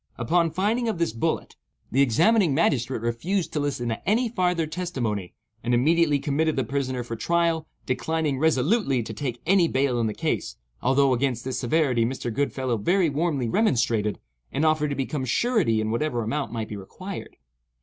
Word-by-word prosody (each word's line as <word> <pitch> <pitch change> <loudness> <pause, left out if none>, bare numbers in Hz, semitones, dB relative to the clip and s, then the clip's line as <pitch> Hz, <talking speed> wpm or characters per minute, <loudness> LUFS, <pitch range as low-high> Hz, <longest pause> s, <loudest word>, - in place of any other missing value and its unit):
Upon 165 +8 +2
finding 215 +8 0
of 215 - -2
this 170 -8 0
bullet, 115 - -2 0.3
the 135 - +3
examining 160 - +3
magistrate 130 -6 +1
refused 165 +11 -1
to 150 - 0
listen 140 -4 -2
to 115 - -3
any 235 +3 +2
farther 180 -6 +1
testimony, 130 - -3 0.3
and 120 0 +2
immediately 155 +3 +3
committed 150 +3 0
the 135 - +1
prisoner 130 0 -2
for 115 -1 -5
trial—declining 160 -1 -1
resolutely 150 - +2
to 110 - -7
take 120 0 -4
any 180 0 +4
bail 130 -4 +1
in 115 - +1
the 105 - -3
case, - - -2 0.3
although 135 +1 +3
against 125 -1 -1
this 130 - -2
severity 130 -2 +2
Mr. 120 -1 -3
Goodfellow 130 -2 -1
very 175 - +2
warmly 145 -4 0
remonstrated, 115 - +1 0.3
and 145 +4 0
offered 155 -1 +2
to 140 - -2
become 135 +1 -2
surety 130 - +1
in 110 0 -1
whatever 120 0 -1
amount 125 +1 -2
might 115 -2 -4
be 105 - -5
required. 185 - -8
140 Hz, 170 wpm, -25 LUFS, 120-165 Hz, 0.3 s, any